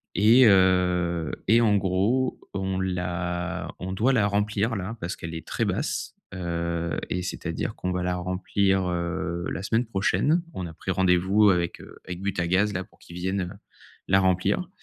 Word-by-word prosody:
et 115 +7 +6
heu, 90 -4 +3 0.2
et 115 +2 +6
en 105 -3 +4
gros, 100 +7 +1 0.2
on 95 -1 -2
l'a 90 -1 -2
on 95 +1 -4
doit 115 +8 +2
la 105 -5 +3
remplir, 105 +2 0
là, 100 +5 -5
parce 85 +2 -3
qu'elle 85 0 -6
est 80 - -7
très - - -1
basse, - - -2 0.2
heu 85 -1 -2
et 90 - -1
c'est-à-dire 90 +3 -4
qu'on 90 - -3
va 90 0 -1
la 90 0 0
remplir, 95 +1 0
heu, 85 0 -2
la 95 - -4
semaine 115 +4 +1
prochaine. 115 - +1
On 95 - -4
a 80 - -9
pris 95 - -4
rendez-vous 95 +3 +4
avec, 85 -2 -1
heu, - - -13
avec 90 0 -6
Butagaz, 95 +1 +1
là, 95 0 -2
pour - - -27
qu'ils 85 - -12
viennent, 95 +2 -1
heu, - - -15 0.5
la 95 - +5
remplir 95 - +1
95 Hz, 175 wpm, -26 LUFS, 90-100 Hz, 0.5 s, et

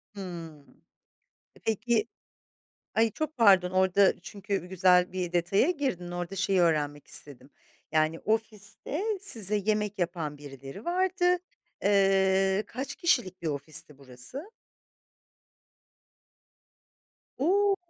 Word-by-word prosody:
Hımm. 165 -6 -9 0.8
E - - -18
peki 225 0 +1 0.9
ay, 225 0 +3
çok 310 +6 -4
pardon 195 -6 +5
orada 190 +1 +3
çünkü 200 -1 -4
güzel 180 -1 +3
bir 180 -2 -3
detaya 175 - +2
girdin 260 - -3
orada 175 +2 -5
şeyi 195 -1 +2
öğrenmek 150 -3 +1
istedim, 135 -1 -3 0.4
yani, 155 +1 +1
ofiste 220 - -2 0.2
size 215 - +3
yemek 210 0 -1
yapan 165 -4 -3
birileri 135 - -10
vardı, 360 0 +2 0.5
eee, 195 0 +3
kaç 260 +4 -5
kişilik 205 - 0
bir - - -3
ofisti 150 0 -2
burası? 140 - -5 2.9
O! 395 +8 +3
190 Hz, 100 wpm, -28 LUFS, 170-225 Hz, 2.9 s, pardon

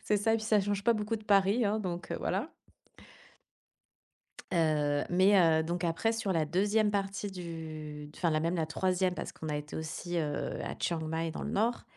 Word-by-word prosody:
C'est 210 - +2
ça 225 +2 +2
et - - +4
puis 220 - -5
ça 215 -2 +4
change 200 0 -1
pas 235 - +5
beaucoup 215 +1 -1
de 215 - -12
Paris, 200 +3 +4
hein, 210 +2 +1
donc 175 -2 -4
heu, - - -1
voilà. 205 - -2 2.0
Heu, 150 -3 +2
mais 185 +3 +5
heu, 160 -3 +5
donc 175 +2 -2
après 175 +7 +1
sur 225 -4 -1
la 160 -2 +2
2e 205 +6 +2
partie 200 0 -2
du 155 -4 -7
enfin, 170 -3 0
la 155 - +2
même 165 +3 0
la 165 -2 +1
3e 185 +2 +1
parce - - -5
qu'on 160 - -7
a 150 - -1
été 150 0 -7
aussi, 170 +2 -3
heu, 150 -2 -2
à - - -5
Chiang 170 -2 -1
Mai 160 +1 -2
dans - - -5
le - - -3
nord 230 +4 +1
180 Hz, 205 wpm, -31 LUFS, 160-205 Hz, 2.0 s, pas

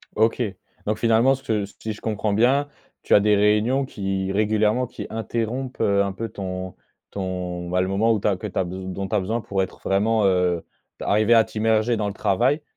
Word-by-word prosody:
OK, 110 +3 +2 0.4
donc 105 +1 0
finalement, 115 +4 +4
cette 110 -6 -2
si 110 - -3
je 105 - -13
comprends 110 -1 -1
bien, 130 +7 +3 0.3
tu - - 0
as 100 - +7
des 105 0 +4
réunions 105 +6 +2
qui 95 -4 -3
régulièrement, 110 +4 +2
qui - - -8
interrompent, 115 +4 -3
heu, 100 -2 +3
un 100 - -2
peu 115 +4 -5
ton 95 -1 -5 0.4
ton, 90 -2 -4
bah, 90 +1 +1
le 95 - 0
moment 105 +4 +2
où 110 - +2
tu - - -1
as 100 - +2
que 105 - -5
tu 95 - -8
as - - +2
bes 90 - -6 0.2
dont 95 +1 -4
tu 105 - -2
as - - +3
besoin 110 +5 -2
pour 95 -2 -1
être 95 - -8
vraiment, 105 +2 +2
heu, 90 -3 +1 0.3
d'arriver 110 +3 +3
à 115 -1 +7
t'immerger 110 +2 +1
dans 105 -1 -1
le 100 - -3
travail 120 - +1
105 Hz, 210 wpm, -23 LUFS, 95-115 Hz, 0.4 s, as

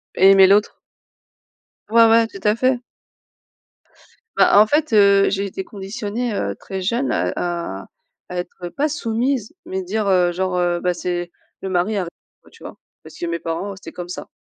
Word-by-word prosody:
Aimer 195 0 +7
l'autre. 205 +2 +3 1.1
Ouais, 230 0 +6
ouais, 225 0 +5
tout 195 - -11
à 210 0 +3
fait. 255 +1 +1 1.6
Ben - - +4
en 215 - +6
fait, 295 -3 0
heu, 200 -1 +5
j'ai 200 0 -1
été 190 0 -5
conditionnée, 210 +4 -5
heu, - - -2
très 190 -1 -6
jeune 235 +8 -1
à - - 0
à 170 - -4 0.4
à 180 - -6
être, 175 0 -7
pas 300 +2 +1
soumise, 245 -2 -2
mais 190 0 -3
dire, 210 +3 -2
heu: 180 -2 +3
«genre, 185 0 -1
heu, 175 -1 +1
beh, 180 -1 +1
c'est 175 0 -4 0.3
le 190 - -4
mari 185 +4 0
avant», 180 -3 -2 0.3
enfin - - -20
tu - - -20
vois? - - -9 0.3
Parce - - -13
que 175 - -4
mes 170 0 -3
parents, 170 +5 -4
c'était - - -11
comme 175 0 -7
ça. - - -7
195 Hz, 180 wpm, -20 LUFS, 180-225 Hz, 1.6 s, Aimer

